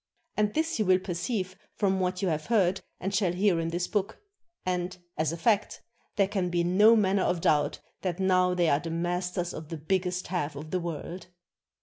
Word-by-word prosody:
And 210 Hz, 0 st, +1 dB
this 320 Hz, -3 st, 0 dB
you 215 Hz, -, +2 dB
will 185 Hz, 0 st, +5 dB
perceive 185 Hz, +1 st, -3 dB, 0.2 s
from 190 Hz, -2 st, +1 dB
what 185 Hz, +1 st, -1 dB
you 190 Hz, -, +2 dB
have 155 Hz, -1 st, -2 dB
heard 195 Hz, -5 st, +2 dB, 0.2 s
and 195 Hz, +2 st, -3 dB
shall 190 Hz, -3 st, +2 dB
hear 185 Hz, -1 st, +2 dB
in 165 Hz, -, -1 dB
this 175 Hz, +2 st, -1 dB
book; 205 Hz, 0 st, -1 dB, 0.5 s
and 180 Hz, 0 st, -2 dB, 0.2 s
(as 155 Hz, -1 st, 0 dB
a 165 Hz, -, -4 dB
fact) 210 Hz, +2 st, +1 dB, 0.3 s
there 200 Hz, -2 st, +3 dB
can 190 Hz, -3 st, -1 dB
be 175 Hz, 0 st, +1 dB
no 205 Hz, +6 st, +6 dB
manner 200 Hz, -2 st, +3 dB
of 180 Hz, -, +1 dB
doubt 150 Hz, -2 st, +2 dB, 0.2 s
that 180 Hz, -1 st, -2 dB
now 185 Hz, -1 st, +3 dB
they 175 Hz, -2 st, +2 dB
are 145 Hz, -2 st, +3 dB
the 165 Hz, +1 st, -6 dB
masters 175 Hz, +1 st, -2 dB
of 155 Hz, -1 st, -8 dB
the 165 Hz, -, -4 dB
biggest 180 Hz, +3 st, -1 dB
half 155 Hz, -5 st, -2 dB
of 150 Hz, +2 st, -8 dB
the 185 Hz, -, +1 dB
world. 170 Hz, +1 st, -6 dB
180 Hz, 205 wpm, -28 LUFS, 170-195 Hz, 0.5 s, no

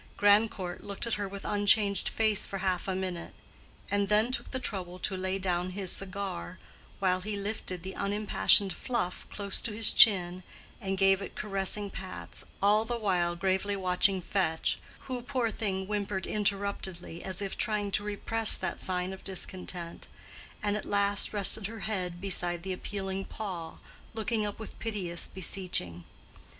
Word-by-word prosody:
Grandcourt 205 Hz, -3 st, +2 dB
looked 200 Hz, +2 st, -4 dB
at 230 Hz, -, -1 dB
her 205 Hz, -1 st, -2 dB
with 200 Hz, 0 st, -8 dB
unchanged 205 Hz, -1 st, +3 dB
face 215 Hz, -2 st, +1 dB
for 195 Hz, -, -4 dB
half 190 Hz, -1 st, -1 dB
a 190 Hz, -, -1 dB
minute, 185 Hz, -2 st, -5 dB, 0.6 s
and 200 Hz, -1 st, +1 dB
then 215 Hz, +3 st, +3 dB
took 255 Hz, -, -2 dB
the 260 Hz, -, -3 dB
trouble 185 Hz, -6 st, -4 dB
to 190 Hz, +1 st, -3 dB
lay 190 Hz, +1 st, -2 dB
down 180 Hz, -1 st, -1 dB
his 190 Hz, -1 st, 0 dB
cigar 195 Hz, -, -3 dB, 0.4 s
while 185 Hz, -1 st, +1 dB
he 210 Hz, +2 st, -3 dB
lifted 200 Hz, -4 st, -4 dB
the 190 Hz, +1 st, -6 dB
unimpassioned 205 Hz, -1 st, +3 dB
Fluff 230 Hz, -8 st, -3 dB
close 200 Hz, -2 st, 0 dB
to 230 Hz, -, -2 dB
his 220 Hz, 0 st, +6 dB
chin 185 Hz, -4 st, +5 dB, 0.4 s
and 195 Hz, -2 st, -2 dB
gave 195 Hz, 0 st, +4 dB
it 195 Hz, -, -7 dB
caressing 200 Hz, 0 st, -1 dB
pats, 190 Hz, 0 st, -7 dB, 0.2 s
all 210 Hz, +2 st, +4 dB
the 240 Hz, +1 st, -3 dB
while 180 Hz, -5 st, 0 dB
gravely 190 Hz, +2 st, 0 dB
watching 185 Hz, 0 st, +2 dB
Fetch, 165 Hz, -4 st, 0 dB, 0.2 s
who, 255 Hz, -2 st, -5 dB
poor 250 Hz, -3 st, -1 dB
thing, 190 Hz, -4 st, -2 dB
whimpered 200 Hz, -2 st, -2 dB
interruptedly, 200 Hz, -4 st, -2 dB
as 190 Hz, 0 st, -3 dB
if 200 Hz, -1 st, -3 dB
trying 210 Hz, -2 st, 0 dB
to 205 Hz, -, 0 dB
repress 210 Hz, +2 st, +5 dB
that 185 Hz, -2 st, -4 dB
sign 185 Hz, 0 st, -2 dB
of 190 Hz, -, -11 dB
discontent, 180 Hz, -2 st, -4 dB, 0.6 s
and 205 Hz, 0 st, +1 dB
at 210 Hz, -, -3 dB
last 200 Hz, 0 st, +4 dB
rested 205 Hz, 0 st, +6 dB
her 225 Hz, -1 st, -9 dB
head 180 Hz, -5 st, -3 dB
beside 175 Hz, -3 st, +3 dB
the 190 Hz, 0 st, -3 dB
appealing 195 Hz, 0 st, -4 dB
paw, 180 Hz, -8 st, -6 dB, 0.4 s
looking 220 Hz, -1 st, -1 dB
up 205 Hz, -, -6 dB
with 220 Hz, -, -10 dB
piteous 190 Hz, -7 st, -3 dB
beseeching. 180 Hz, -, -3 dB
195 Hz, 160 wpm, -29 LUFS, 185-210 Hz, 0.6 s, his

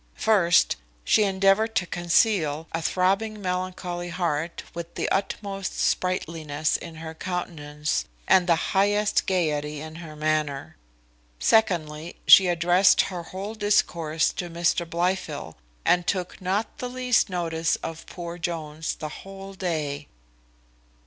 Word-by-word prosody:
First, 175 Hz, -6 st, +4 dB, 0.3 s
she 215 Hz, -, +4 dB
endeavoured 195 Hz, +3 st, +2 dB
to 180 Hz, -, +2 dB
conceal 170 Hz, -3 st, +1 dB
a 165 Hz, -, -2 dB
throbbing 195 Hz, +6 st, +1 dB
melancholy 180 Hz, -2 st, -3 dB
heart 170 Hz, -2 st, -2 dB
with 170 Hz, 0 st, -7 dB
the -, -, -1 dB
utmost 195 Hz, 0 st, -2 dB
sprightliness 160 Hz, -4 st, 0 dB
in 165 Hz, -1 st, -6 dB
her 160 Hz, 0 st, -7 dB
countenance, 150 Hz, -4 st, -3 dB, 0.2 s
and 185 Hz, -1 st, +5 dB
the 170 Hz, -, +5 dB, 0.2 s
highest 205 Hz, +2 st, +2 dB
gaiety 150 Hz, -5 st, 0 dB
in 160 Hz, +1 st, -8 dB
her 160 Hz, -2 st, -9 dB
manner. 150 Hz, -2 st, -1 dB, 0.6 s
Secondly, 165 Hz, -, +1 dB
she 190 Hz, -, +9 dB
addressed 175 Hz, +2 st, +4 dB
her 175 Hz, -, -4 dB
whole 190 Hz, +5 st, -6 dB
discourse 170 Hz, -7 st, +1 dB
to 175 Hz, -, -4 dB
Mr 170 Hz, 0 st, 0 dB
Blifil, 170 Hz, -, -2 dB, 0.3 s
and 175 Hz, -1 st, +3 dB
took 185 Hz, -2 st, -2 dB
not 195 Hz, +4 st, -2 dB
the 250 Hz, -, -3 dB
least 250 Hz, -3 st, +2 dB
notice 165 Hz, -2 st, 0 dB
of 165 Hz, 0 st, -6 dB
poor 175 Hz, -1 st, -7 dB
Jones 160 Hz, -2 st, -3 dB
the 155 Hz, -, -6 dB
whole 195 Hz, 0 st, -10 dB
day. 155 Hz, -6 st, -3 dB
175 Hz, 125 wpm, -25 LUFS, 160-190 Hz, 0.6 s, she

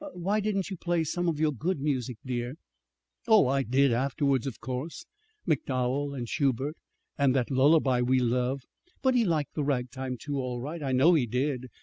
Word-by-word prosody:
"Why 195 Hz, +5 st, 0 dB
didn't 200 Hz, -2 st, -1 dB
you 190 Hz, -, -4 dB
play 170 Hz, -1 st, 0 dB
some 175 Hz, +3 st, -1 dB
of 155 Hz, -3 st, -2 dB
your 155 Hz, -1 st, +2 dB
good 155 Hz, +6 st, -2 dB
music, 130 Hz, -4 st, -2 dB
dear?" 125 Hz, +1 st, -3 dB, 0.7 s
"Oh, 220 Hz, -8 st, +6 dB
I 135 Hz, +2 st, +2 dB
did, 135 Hz, +2 st, +3 dB
afterwards, 135 Hz, +1 st, +1 dB
of 130 Hz, -, -6 dB
course, 130 Hz, -, -5 dB, 0.4 s
MacDowell 140 Hz, -1 st, 0 dB
and 120 Hz, -3 st, -4 dB
Schubert, 140 Hz, +3 st, 0 dB, 0.4 s
and 140 Hz, -2 st, +3 dB
that 130 Hz, 0 st, 0 dB
lullaby 135 Hz, -1 st, +4 dB
we 130 Hz, +2 st, +2 dB
love. 125 Hz, +2 st, 0 dB, 0.4 s
But 260 Hz, -1 st, +4 dB
he 245 Hz, -2 st, +3 dB
liked 160 Hz, -7 st, 0 dB
the 150 Hz, -, -1 dB
ragtime, 130 Hz, -1 st, -2 dB
too, 140 Hz, +2 st, -4 dB
all 125 Hz, -2 st, -3 dB
right. 150 Hz, +6 st, -5 dB
I 135 Hz, -2 st, -2 dB
know 135 Hz, +7 st, +5 dB
he 140 Hz, -7 st, +2 dB
did. 130 Hz, +1 st, -2 dB
140 Hz, 185 wpm, -28 LUFS, 125-155 Hz, 0.7 s, Oh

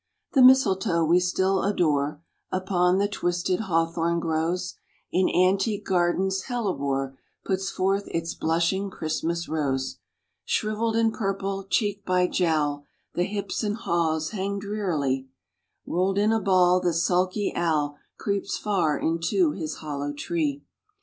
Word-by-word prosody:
The 270 Hz, -, +5 dB
mistletoe 195 Hz, -10 st, +5 dB
we 170 Hz, +3 st, +4 dB
still 190 Hz, +2 st, +1 dB
adore 150 Hz, -6 st, 0 dB, 0.3 s
Upon 185 Hz, -1 st, +2 dB
the 200 Hz, +1 st, +2 dB
twisted 175 Hz, -2 st, -1 dB
hawthorn 165 Hz, -3 st, 0 dB
grows: 165 Hz, +3 st, -1 dB, 0.4 s
In 185 Hz, 0 st, +2 dB
antique 195 Hz, +3 st, +2 dB
gardens 190 Hz, +1 st, +1 dB
hellebore 140 Hz, -, -2 dB, 0.3 s
Puts 190 Hz, 0 st, -1 dB
forth 195 Hz, +2 st, 0 dB
its 165 Hz, 0 st, -3 dB
blushing 170 Hz, +5 st, 0 dB
Christmas 170 Hz, 0 st, -2 dB
rose. 135 Hz, -4 st, -2 dB, 0.4 s
Shrivell'd 220 Hz, +1 st, -1 dB
and 225 Hz, -1 st, +2 dB
purple, 195 Hz, -1 st, -2 dB
cheek 205 Hz, -1 st, 0 dB
by 180 Hz, -1 st, +2 dB
jowl, 150 Hz, -5 st, 0 dB, 0.3 s
The 175 Hz, -, +1 dB
hips 200 Hz, +2 st, -3 dB
and 210 Hz, -1 st, 0 dB
haws 160 Hz, -6 st, 0 dB
hang 200 Hz, -1 st, -2 dB
drearily; 165 Hz, -11 st, -2 dB, 0.6 s
Roll'd 190 Hz, +2 st, 0 dB
in 210 Hz, +2 st, +3 dB
a 225 Hz, -1 st, +1 dB
ball 185 Hz, -2 st, +4 dB
the 175 Hz, -2 st, +1 dB
sulky 185 Hz, +4 st, +1 dB
owl 150 Hz, -4 st, 0 dB, 0.2 s
Creeps 200 Hz, -1 st, -2 dB
far 180 Hz, -8 st, +1 dB
into 170 Hz, -, +1 dB
his 160 Hz, -, -4 dB
hollow 145 Hz, -2 st, -4 dB
tree. 145 Hz, -1 st, -2 dB
180 Hz, 130 wpm, -25 LUFS, 160-195 Hz, 0.6 s, The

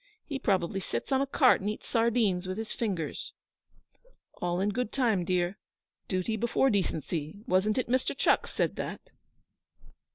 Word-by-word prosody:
He 280 Hz, -3 st, -4 dB
probably 195 Hz, -4 st, +1 dB
sits 195 Hz, -, -4 dB
on 265 Hz, 0 st, +3 dB
a 275 Hz, -, 0 dB
cart 265 Hz, -4 st, +4 dB
and 200 Hz, -, -1 dB
eats 215 Hz, -, -6 dB
sardines 225 Hz, -6 st, +2 dB
with 185 Hz, +1 st, -3 dB
his 220 Hz, 0 st, -4 dB
fingers.' 190 Hz, -9 st, -3 dB, 1.1 s
'All 175 Hz, 0 st, 0 dB
in 200 Hz, +2 st, +1 dB
good 235 Hz, +1 st, -2 dB
time, 225 Hz, -9 st, +2 dB
dear. 180 Hz, +2 st, 0 dB, 0.5 s
Duty 185 Hz, +4 st, -1 dB
before 235 Hz, +4 st, +2 dB
decency 165 Hz, -4 st, -1 dB
wasn't 195 Hz, +5 st, +2 dB
it 255 Hz, -, 0 dB
Mr. 255 Hz, +2 st, 0 dB
Chucks -, -, +2 dB
said -, -, 0 dB
that?' -, -, -6 dB
205 Hz, 155 wpm, -29 LUFS, 185-235 Hz, 1.1 s, cart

